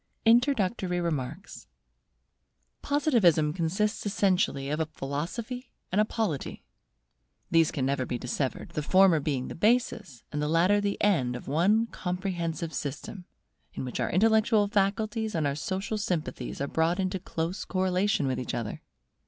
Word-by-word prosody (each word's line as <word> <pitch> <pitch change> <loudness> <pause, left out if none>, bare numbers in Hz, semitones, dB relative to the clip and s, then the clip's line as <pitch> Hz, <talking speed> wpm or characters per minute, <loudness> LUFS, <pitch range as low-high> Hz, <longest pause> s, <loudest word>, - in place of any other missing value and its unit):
INTRODUCTORY 225 -7 +3
REMARKS 170 +2 -4 1.1
Positivism 205 - +3
consists 190 +5 -1
essentially 185 -9 +1
of 150 - -1
a 160 - 0
Philosophy 200 - -5 0.2
and 205 - +3
a - - +3
Polity. 210 - -3 0.9
These 165 -2 +5
can 130 - -2
never 135 -1 0
be 125 - -2
dissevered; 130 +2 -3
the 150 - -3
former 185 +1 +5
being 140 -3 -2
the - - -6
basis, 210 - 0
and 150 - -2
the 150 - 0
latter 180 +6 +3
the 200 -1 -1
end 135 -12 +2
of 125 - -8
one 195 +10 +3
comprehensive 175 -5 -3
system, 150 +7 -5 0.5
in - - -4
which 125 - -5
our - - 0
intellectual 220 +2 +3
faculties 215 +2 0
and 160 -2 +1
our 140 - +1
social 190 +8 -3
sympathies 160 -10 -3
are 140 - -1
brought 165 +5 +1
into 190 0 -1
close 170 +1 -3
correlation 185 -2 +1
with 130 -1 -1
each 125 - -3
other. 115 -3 -4
180 Hz, 145 wpm, -28 LUFS, 150-205 Hz, 1.1 s, These